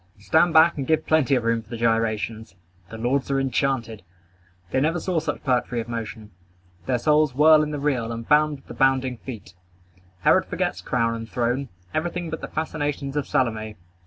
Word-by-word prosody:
Stand 160 - +3
back 160 +1 +5
and 135 - -3
give 160 0 +1
plenty 150 -4 +3
of 125 - 0
room 115 0 +1
for 110 - -23
the 115 - -5
gyrations. 115 -2 -1 0.3
The 115 - -8
lords 125 +4 -1
are 135 0 +1
enchanted. 130 -4 -1 0.7
They 130 - +1
never 165 +4 +1
saw 175 0 -1
such 155 -2 -4
poetry 125 -2 0
of 115 - -4
motion. 110 -2 -6 0.6
Their 125 - +2
souls 150 +1 +2
whirl 155 +2 +6
in 150 - -1
the 150 - -3
reel, 130 -5 -1
and 115 0 -6
bound 150 0 +4
with 135 - -17
the - - -8
bounding 130 -2 +1
feet. 110 -8 -9 0.7
Herod - - +4
forgets - - -2
crown 115 -2 0
and 115 -1 -6
throne, 125 +3 -1 0.2
everything 175 +1 -2
but 160 - -5
the - - -5
fascinations 145 -3 -3
of 145 -2 -1
Salome. 110 -3 -1
130 Hz, 190 wpm, -24 LUFS, 115-150 Hz, 0.7 s, whirl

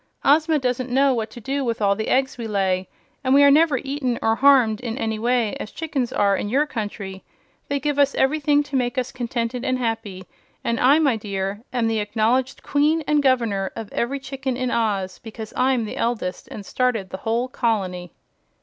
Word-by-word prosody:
Ozma 310 +2 +4
doesn't 255 -1 -1
know 270 +2 +3
what 225 -2 -2
to - - -11
do 270 +5 -2
with 235 -2 -2
all 200 -1 +2
the 220 - -3
eggs 265 0 +1
we 235 -2 -5
lay, 190 -3 0 0.3
and 260 0 +3
we 285 - +7
are 280 - +7
never 305 -1 +4
eaten 270 -2 -2
or 225 0 +2
harmed 255 -6 +4
in 235 -1 -4
any 220 -4 -2
way, 235 -2 +1
as - - -5
chickens 280 -6 -3
are 200 -1 +2
in 205 - -3
your 280 +6 +2
country. 205 -7 -6 0.4
They 280 0 -1
give 290 +1 -1
us 280 -1 +3
everything 290 +1 +2
to 290 -1 -7
make 250 +1 0
us 255 0 -1
contented 240 0 -3
and 255 -1 0
happy, 225 -6 -3 0.4
and 230 0 -1
I, 270 +4 +5
my 280 -7 +2
dear, 200 -1 -4
am 245 -3 0
the 225 -1 0
acknowledged 230 +5 0
Queen 305 +3 +2
and 300 0 +2
Governor 230 -8 +1
of 225 -2 -7
every 270 +4 -1
chicken 265 -1 -4
in 255 -1 -1
Oz, 195 -5 -1
because 220 -1 -9
I'm 255 -2 +2
the 210 - -6
eldest 230 -6 -2
and 205 - -9
started 235 -6 -1
the - - -4
whole 230 +5 -1
colony." 190 -9 -2
245 Hz, 200 wpm, -22 LUFS, 215-270 Hz, 0.4 s, we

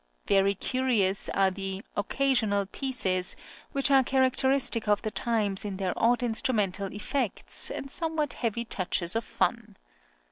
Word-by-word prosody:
Very 200 0 +3
curious 225 -5 +1
are 195 -1 +2
the 195 +1 -5
"Occasional 215 -3 +1
Pieces" 195 -6 -1 0.4
which 275 0 0
are 270 -1 +6
characteristic 260 -2 +2
of 205 0 +2
the 215 - -2
times, 210 -4 +1
in 200 -2 -4
their 185 -2 -1
odd 240 +2 +2
instrumental 210 -5 0
effects, 225 +1 -1
and 275 - -6
somewhat 315 -4 -1
heavy 235 0 -2
touches 185 -3 -2
of 225 - 0
fun. - - -2
220 Hz, 135 wpm, -28 LUFS, 195-260 Hz, 0.4 s, are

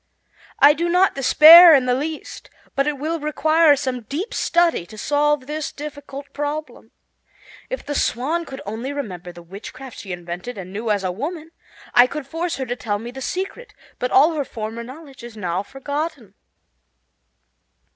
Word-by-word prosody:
I 285 +2 +7
do 340 +3 -2
not 360 +2 +3
despair 315 +5 +9
in 265 -2 +2
the 250 - +2
least, 300 +4 -5 0.3
but 275 +1 +1
it 295 -1 -1
will 320 +4 -3
require 310 +1 +3
some 260 -3 -3
deep 330 - -5
study 345 - +1
to 215 - -13
solve 295 +2 +1
this 300 +1 -4
difficult 285 -1 -9
problem. 295 +1 -5 0.8
If - - -5
the 290 - -3
Swan 295 +6 -1
could 270 -2 -9
only 225 +7 -5
remember 185 -11 -6
the 175 0 -13
witchcraft 225 +8 -10
that - - -7
she 195 - -9
invented 175 +6 -6
and 185 -1 -8
knew 220 +3 -4
as 205 -2 0
a 185 - -1
woman, 310 - -6 0.4
I 245 +1 +7
could 295 +1 -6
force 330 +5 -3
her 265 - -4
to 245 0 -3
tell 210 -4 -3
me 235 +3 -8
the 265 +1 -9
secret, 390 - -5 0.2
but 250 - -1
all 300 +7 +5
her 300 -2 -1
former 225 -2 -6
knowledge 270 +1 -12
is 235 -2 -10
now 180 -2 -2
forgotten." 285 - -5
275 Hz, 175 wpm, -21 LUFS, 235-310 Hz, 0.8 s, despair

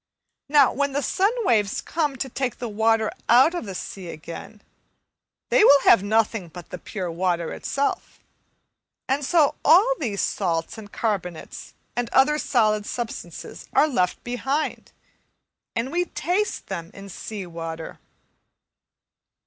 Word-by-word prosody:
Now, 285 -2 +5
when 280 +1 0
the 285 +1 0
sun 390 +9 +2 0.2
waves 210 - +2
come 300 -4 -1
to 265 +1 -3
take 255 -1 -3
the 245 - -4
water 220 0 +2 0.2
out 260 +8 +6
of 350 - -4
the 190 - -6
sea 185 0 -7
again, 170 +6 -9 0.9
they - - +5
will 285 -9 +7
have 230 - +6
nothing 215 -2 +1
but 170 +1 -11
the 180 - -6
pure 185 -3 -5
water 170 -1 -1
itself; 280 +1 -2 0.9
and 275 +2 0
so 300 0 +3
all 400 +10 +6
these 215 -9 -2
salts 165 -4 -1
and 205 -1 -11
carbonates 190 -7 -4 0.2
and 245 -1 -1
other 300 +3 +4
solid 215 -6 +1
substances 240 -2 -6
are 305 - +5
left 180 - 0
behind, 265 +5 -2 0.8
and 235 +4 -2
we 350 +2 +1
taste 365 +5 -2
them 170 -3 -5
in 200 0 -10
sea 200 +1 -7
water. 165 -1 -7
225 Hz, 140 wpm, -24 LUFS, 190-280 Hz, 0.9 s, will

